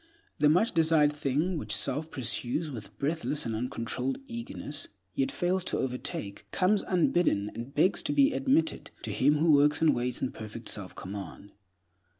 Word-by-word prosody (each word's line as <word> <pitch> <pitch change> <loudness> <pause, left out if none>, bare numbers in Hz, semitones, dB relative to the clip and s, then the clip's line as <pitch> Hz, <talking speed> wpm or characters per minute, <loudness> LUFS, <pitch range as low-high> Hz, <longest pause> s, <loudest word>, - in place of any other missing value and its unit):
The 150 - +5
much 180 +9 +3
desired 160 -3 +4
thing 150 +4 0
which 105 -2 0
self 145 +7 0
pursues 130 +5 -1
with 105 -5 -9
breathless 150 0 -1
and 115 -1 -2
uncontrolled 125 +2 -2
eagerness, 235 - -5 0.3
yet 135 0 0
fails 180 +1 0
to - - -1
overtake, 125 -5 -4
comes 200 +2 +2
unbidden, 175 - +2
and 120 +4 -7
begs 180 +6 +3
to - - +1
be 285 -1 +4
admitted, 285 +5 +1
to - - -3
him 150 - +3
who 160 +2 +3
works 145 +1 +4
and 160 -1 +4
waits 125 +1 -2
in 130 - -2
perfect 110 +1 -6
self 95 -3 -3
command. 100 +1 -8
145 Hz, 160 wpm, -29 LUFS, 120-175 Hz, 0.3 s, The